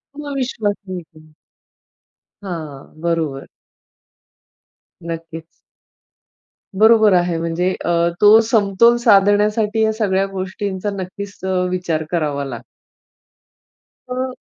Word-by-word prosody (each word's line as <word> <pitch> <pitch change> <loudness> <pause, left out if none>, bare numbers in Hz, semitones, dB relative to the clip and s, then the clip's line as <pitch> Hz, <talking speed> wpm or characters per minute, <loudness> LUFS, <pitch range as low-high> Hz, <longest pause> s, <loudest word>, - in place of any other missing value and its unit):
किंवा 290 0 -7
विश्वास 240 -6 -1
आहे 185 -1 -4
पण. 155 0 -18 1.1
हां, 155 -5 -8
बरोबर. 160 -5 -2 1.6
नक्कीच. 165 -1 -6 1.3
बरोबर 220 -1 +5
आहे, 175 -1 +2
म्हणजे 165 +2 -1 0.2
अ, - - -1 0.3
तो 210 +1 +8
समतोल 225 +2 +4
साधण्यासाठी 210 +1 +3
या 220 0 +2
सगळ्या 195 -3 0
गोष्टींचा 190 +1 -4
नक्कीच 195 +1 -7
अ, 185 -1 0
विचार 180 -3 -2
करावा 150 -5 -1
लागतो. 120 -3 -7 1.4
अ 255 +1 -3
190 Hz, 95 wpm, -19 LUFS, 165-215 Hz, 1.6 s, तो